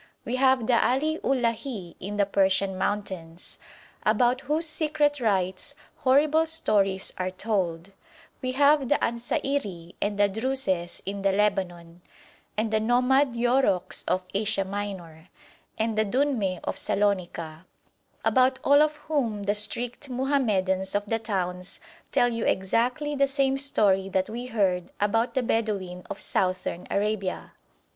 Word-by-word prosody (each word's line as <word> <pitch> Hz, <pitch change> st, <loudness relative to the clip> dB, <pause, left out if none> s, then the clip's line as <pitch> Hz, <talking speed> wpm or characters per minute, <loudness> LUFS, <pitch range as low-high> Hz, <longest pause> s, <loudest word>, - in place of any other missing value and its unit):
We 250 Hz, -, -2 dB
have 260 Hz, -3 st, +3 dB
the 235 Hz, 0 st, +3 dB
Ali 310 Hz, +5 st, +1 dB
Ullah 250 Hz, -3 st, +2 dB
hi 215 Hz, -8 st, -7 dB
in 200 Hz, +3 st, -5 dB
the 205 Hz, -1 st, +2 dB
Persian 195 Hz, 0 st, +2 dB
mountains, 185 Hz, -4 st, -4 dB, 0.4 s
about 240 Hz, +4 st, +2 dB
whose 310 Hz, +4 st, -1 dB
secret 300 Hz, -2 st, +1 dB
rites 195 Hz, +3 st, -1 dB, 0.2 s
horrible 305 Hz, +3 st, +3 dB
stories 200 Hz, -11 st, +2 dB
are 185 Hz, 0 st, 0 dB
told; 185 Hz, -3 st, -2 dB, 0.5 s
we 255 Hz, 0 st, -2 dB
have 285 Hz, -1 st, +4 dB
the 290 Hz, -, +4 dB
Ansairi 230 Hz, -8 st, -2 dB
and 205 Hz, 0 st, -1 dB
the 205 Hz, 0 st, +4 dB
Druses 200 Hz, -5 st, -1 dB
in 200 Hz, +1 st, -4 dB
the 195 Hz, 0 st, +2 dB
Lebanon, 180 Hz, -4 st, -1 dB, 0.6 s
and 220 Hz, +1 st, 0 dB
the 215 Hz, -, +3 dB
nomad 250 Hz, +3 st, +2 dB
Yourouks 240 Hz, -6 st, +2 dB
of 185 Hz, -, +1 dB
Asia 200 Hz, -1 st, +1 dB
Minor, 190 Hz, -5 st, -6 dB, 0.5 s
and 220 Hz, 0 st, 0 dB
the 215 Hz, -, +3 dB
Dünmeh 220 Hz, -5 st, 0 dB
of -, -, -3 dB
Salonika, 180 Hz, -4 st, -2 dB, 0.6 s
about 260 Hz, 0 st, +3 dB
all 285 Hz, +1 st, +6 dB
of 305 Hz, 0 st, +2 dB
whom 235 Hz, -10 st, -1 dB
the 200 Hz, +1 st, +1 dB
strict 235 Hz, +6 st, -1 dB
Mohammedans 210 Hz, -9 st, 0 dB
of 205 Hz, 0 st, 0 dB
the 225 Hz, +2 st, -1 dB
towns 180 Hz, -4 st, -3 dB, 0.3 s
tell 245 Hz, -, +3 dB
you 230 Hz, -1 st, -3 dB
exactly 245 Hz, +10 st, 0 dB
the 275 Hz, -1 st, +2 dB
same 270 Hz, -1 st, +1 dB
story 205 Hz, -9 st, +2 dB
that 190 Hz, +1 st, -1 dB
we 240 Hz, +2 st, -5 dB
heard 190 Hz, -6 st, 0 dB
about 225 Hz, +5 st, +1 dB
the 260 Hz, -, +1 dB
Bedouin 200 Hz, -6 st, -1 dB
of -, -, -6 dB
Southern 185 Hz, -1 st, -1 dB
Arabia. 200 Hz, -2 st, -2 dB
215 Hz, 140 wpm, -26 LUFS, 190-260 Hz, 0.6 s, all